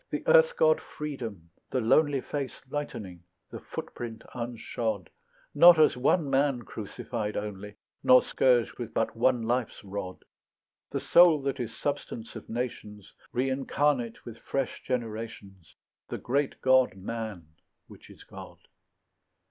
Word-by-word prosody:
The - - -4
earth 485 0 +5
god - - +4
Freedom, 115 - -7 0.2
the 130 - 0
lonely 135 +4 +3
Face 140 -1 -5
lightening, 105 - -5 0.3
the - - -7
footprint 115 -2 -7
unshod, 115 -4 -4 0.4
Not 170 +3 +8
as 155 - +5
one 140 +5 +2
man 135 -2 +1
crucified 110 0 -5
only 105 0 -6 0.3
Nor 125 0 +7
scourged 125 -3 +2
with 120 - -6
but 115 - 0
one 120 0 +2
life's 120 0 -2
rod; 95 -2 -6 0.6
The - - -2
soul 170 -3 +6
that 140 0 -2
is 115 -2 -5
substance 140 -5 -4
of - - -9
nations, 105 -4 -5 0.2
Reincarnate 130 -1 0
with 115 -1 -9
fresh 135 -1 -3
generations; 110 - -5 0.3
The - - -3
great 140 +2 -1
god 130 -5 +4
Man, 105 -4 -6 0.4
which - - -16
is - - -14
God. - - -11
120 Hz, 130 wpm, -28 LUFS, 110-140 Hz, 0.6 s, Not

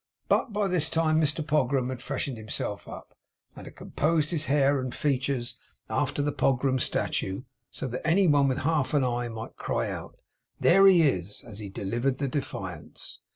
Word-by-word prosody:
But 250 - +2
by 205 -1 0
this 180 -5 +2
time 160 -1 +2
Mr 150 0 +1
Pogram 135 -4 +1
had 130 -2 -5
freshened 130 0 -3
himself 105 -1 -4
up, - - -10 0.4
and - - -10
had - - -11
composed 155 0 0
his 155 -3 0
hair 140 -1 +3
and 130 -1 -4
features 135 -3 -1 0.3
after 145 - 0
the 145 - 0
Pogram 130 -1 +1
statue, 95 -3 -1 0.3
so - - -5
that 125 +1 -4
any 175 +5 +3
one 145 -3 +4
with 130 -1 0
half 150 -1 0
an 140 - +3
eye 120 -1 -1
might 115 -1 -8
cry - - -1
out, - - -7 0.4
'There 195 +3 +6
he 180 -4 +7
is! 100 - 0
as 110 -3 -10
he 105 -2 -6
delivered 120 +7 -1
the 140 - -1
Defiance! 135 +1 -5
140 Hz, 180 wpm, -27 LUFS, 125-155 Hz, 0.4 s, he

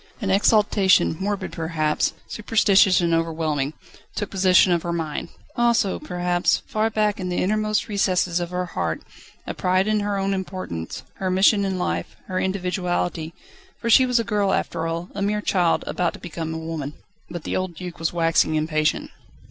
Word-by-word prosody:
An 200 -5 -1
exaltation, 200 -3 +4
morbid 195 -1 -2
perhaps, 160 -2 -1
superstitious 200 -3 +3
and 170 -1 +1
overwhelming, 160 -3 -1 0.4
took 205 - -3
possession 185 -1 +4
of 170 -1 +2
her 170 - -3
mind; 165 -1 -3 0.3
also, 235 -5 +2
perhaps, 175 0 0
far 215 +1 0
back 210 -2 0
in 180 -1 -3
the 180 - -2
innermost 215 +2 0
recesses 185 -4 +1
of 175 -1 -3
her 180 0 -2
heart, 85 - -3 0.4
a - - -4
pride 185 +1 +1
in 215 0 +1
her 205 -1 -1
own 195 0 0
importance, 185 - -5
her 190 - -2
mission 195 +2 +4
in 190 -1 -1
life, 85 - -3
her 185 -1 -2
individuality: 180 -3 -2 0.4
for 235 - -1
she 255 +3 +6
was 250 -1 +2
a - - +1
girl 205 -2 +1
after 165 - -1
all, 170 +2 -4
a 200 - -5
mere 210 +1 0
child, 180 -5 +1
about 175 -2 -1
to - - -10
become 165 -2 -5
a 160 - -4
woman. 160 -3 -5 0.3
But 175 -2 -6
the - - -3
old 185 -2 -2
Duc 180 0 -8
was 165 - 0
waxing 165 -2 +2
impatient. 155 0 0
180 Hz, 175 wpm, -23 LUFS, 165-200 Hz, 0.4 s, she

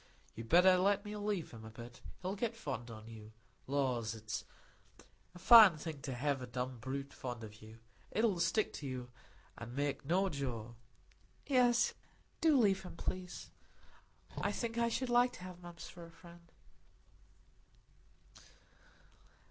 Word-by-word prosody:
You'd 115 0 -8
better 180 +1 +7
let 200 +2 +2
me 210 0 -5
leave 205 -4 -2
him 115 -1 -10
a 110 - -8
bit; 120 +2 -11 0.2
he'll 185 +2 -2
get 230 +2 -2
fond 120 - -5
on 110 -1 -10
you. 110 -1 -11 0.3
Lors, 125 -5 0
it's 110 -1 -5 0.9
a - - -9
fine 200 -2 +9
thing 150 -2 -6
to 130 -1 -4
hev 135 +1 0
a 125 - -6
dumb 125 +1 -4
brute 135 +4 -5
fond 120 -3 -6
on 110 - -7
you; 110 +1 -13 0.3
it'll 215 -5 +1
stick 185 +6 +1
to 145 - -6
you, 125 -1 -5 0.5
an' 120 +2 -7
make 145 0 -1
no 180 +7 +2
jaw." 125 - -4 0.7
"Yes, 245 -3 +4 0.5
do 315 -3 +5
leave 195 -5 +3
him, 185 - -9
please," 180 +1 -5 0.8
said - - -18
Maggie. - - 0
"I - - -1
think 235 -1 -3
I 235 0 +3
should 255 +2 -2
like 245 +1 +4
to - - -10
have 180 -1 -9
Mumps 175 -1 -9
for 175 - -11
a 165 - -11
friend." 170 0 -16
165 Hz, 160 wpm, -35 LUFS, 120-195 Hz, 0.9 s, fine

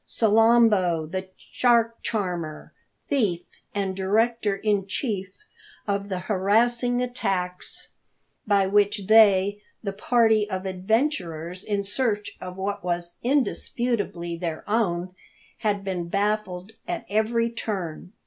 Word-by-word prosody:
Salambo, 220 -6 +4
the 185 +4 -4
shark 230 -2 +1
charmer, 175 -8 -3 0.3
thief, 210 - +1 0.3
and 195 -2 -1
director 210 +2 +1
in 200 -1 0
chief 195 -2 -2 0.6
of 200 0 -1
the 185 -2 -2
harassing 235 +6 +2
attacks 185 -7 -3 0.6
by 200 -2 +4
which 205 0 +2
they, 205 -1 +5 0.2
the 200 -2 -3
party 220 0 +3
of 190 -1 -3
adventurers 185 - -1
in 205 -2 -1
search 210 0 -1
of 180 0 -7
what 195 0 -3
was 175 -1 -3
indisputably 235 -9 -1
their 165 -2 -4
own, 185 -5 0 0.5
had 205 -3 0
been 180 -3 -3
baffled 200 -1 -1 0.2
at - - -3
every 230 +2 +1
turn. 185 -7 -5
200 Hz, 110 wpm, -25 LUFS, 185-225 Hz, 0.6 s, they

